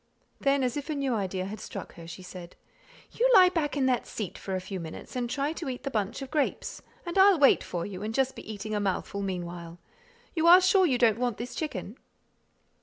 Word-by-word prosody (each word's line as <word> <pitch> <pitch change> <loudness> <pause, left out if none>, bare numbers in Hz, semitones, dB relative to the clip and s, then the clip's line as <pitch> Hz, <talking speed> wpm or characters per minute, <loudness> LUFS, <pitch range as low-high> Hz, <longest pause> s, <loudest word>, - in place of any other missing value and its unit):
Then, 275 -1 +2
as 250 +2 -1
if 290 +2 -5
a 305 - -1
new 275 -3 0
idea 190 -3 -2
had 205 +2 -6
struck - - -7
her, 165 -1 -11
she 170 +2 -9
said, 180 -1 -10 0.6
"You - - +2
lie 370 -2 +8
back 305 -5 -1
in 270 - +2
that 255 -2 +1
seat 210 -5 -5
for 190 - -4
a - - -1
few 190 +1 -6
minutes, 160 +7 -8
and 245 -1 -2
try 280 +4 -1
to 325 -3 -5
eat 250 0 -6
the 275 - -3
bunch 215 +4 -2
of 265 - -9
grapes, 300 -3 -1 0.2
and 345 +2 -1
I'll 390 -1 +7
wait 280 -3 +5
for 175 -1 -4
you, 195 -2 -7
and 215 +1 -3
just 265 +2 0
be - - -8
eating 215 +1 -5
a 210 - +1
mouthful 200 0 -2
meanwhile. 175 -3 -5 0.6
You 330 -1 +1
are 355 +2 +10
sure 375 0 +4
you 260 -5 +2
don't 230 -2 +3
want 245 -4 -1
this 240 +1 -6
chicken?" 235 - -5
240 Hz, 230 wpm, -28 LUFS, 190-290 Hz, 0.6 s, are